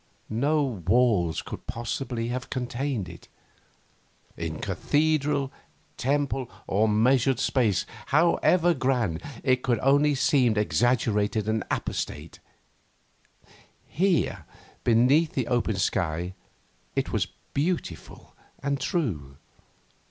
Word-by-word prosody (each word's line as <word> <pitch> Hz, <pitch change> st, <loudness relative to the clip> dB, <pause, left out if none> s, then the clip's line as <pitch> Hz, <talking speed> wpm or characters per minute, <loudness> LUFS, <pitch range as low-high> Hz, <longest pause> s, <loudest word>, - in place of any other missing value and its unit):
No 145 Hz, +7 st, +2 dB, 0.2 s
walls 105 Hz, -7 st, +3 dB
could -, -, -8 dB
possibly 120 Hz, 0 st, -3 dB
have 125 Hz, 0 st, -4 dB
contained 125 Hz, -4 st, -2 dB
it. 85 Hz, -1 st, -12 dB, 1.1 s
In -, -, -4 dB
cathedral, 145 Hz, -2 st, 0 dB, 0.4 s
temple, 135 Hz, -1 st, -1 dB, 0.2 s
or 110 Hz, +3 st, +2 dB
measured 125 Hz, +4 st, +3 dB
space, 115 Hz, -9 st, +1 dB, 0.2 s
however 170 Hz, +3 st, +3 dB
grand, 125 Hz, -, 0 dB, 0.2 s
it 130 Hz, -1 st, +2 dB
could 120 Hz, -3 st, +1 dB
only 140 Hz, +2 st, +4 dB
have 135 Hz, -, -3 dB
seemed 125 Hz, -7 st, +3 dB
exaggerated 105 Hz, +2 st, +1 dB
and 110 Hz, 0 st, 0 dB
apostate; -, -, -4 dB, 1.5 s
here, 165 Hz, -, 0 dB, 0.4 s
beneath 130 Hz, +8 st, +4 dB
the 130 Hz, -, 0 dB
open 120 Hz, -3 st, 0 dB
sky, 90 Hz, -2 st, -1 dB, 0.6 s
it -, -, -1 dB
was -, -, 0 dB, 0.3 s
beautiful 150 Hz, -, -3 dB, 0.3 s
and 140 Hz, 0 st, 0 dB
true. 100 Hz, -, -2 dB
125 Hz, 100 wpm, -26 LUFS, 110-140 Hz, 1.5 s, only